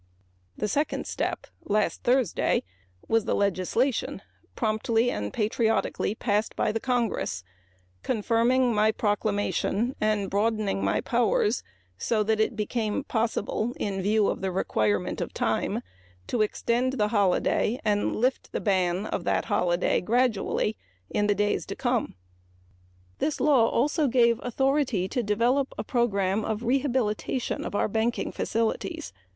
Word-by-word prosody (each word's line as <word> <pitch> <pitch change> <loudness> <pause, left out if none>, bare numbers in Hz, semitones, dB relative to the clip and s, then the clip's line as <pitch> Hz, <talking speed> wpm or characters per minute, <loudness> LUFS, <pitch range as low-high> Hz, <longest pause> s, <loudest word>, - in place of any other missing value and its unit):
The - - -1
second 290 +9 -1
step - - -3 0.2
was 210 +1 +1
the 160 - 0
legislation 200 +6 0 0.3
promptly 225 +1 +1
and 105 0 -3
patriotically 220 -1 0
passed 215 -1 0
by - - +1
the 225 - -2
Congress 230 - -1 0.6
confirming 240 +2 +2
my 215 +1 +3
proclamation 210 +2 0
and 215 -2 +1
broadening 210 -1 0
my - - +1
powers 235 -1 +1 0.4
so 220 -2 +1
that 220 +1 +1
it 220 +2 +1
became 215 +3 -1
possible 225 -1 -1
in 195 -2 -2
view 210 +2 +2
of - - -2
the 190 -1 -1
requirement 110 - 0
of - - -5
time - - -1 0.4
to 240 - -1
extend 235 +4 0
the 210 -5 +1
holiday 205 +3 +1
and 205 -1 +1
lift 255 +4 0
the - - -1
ban 185 -1 +1
of 175 - -3
that - - +1
holiday 175 0 +2
gradually. 220 -1 +1 0.4
This 205 0 +1 1.7
law 265 -6 +4
also 295 +4 +1
gave 235 -2 +3
authority 260 -5 +1
to 245 - -1
develop 240 +6 +1
a - - -2
program 210 -4 +1
of 220 +1 -3
rehabilitation 255 -2 0
of - - -5
our - - +2
banking 225 +2 -1
facilities. 220 - -2
220 Hz, 120 wpm, -27 LUFS, 205-240 Hz, 1.7 s, law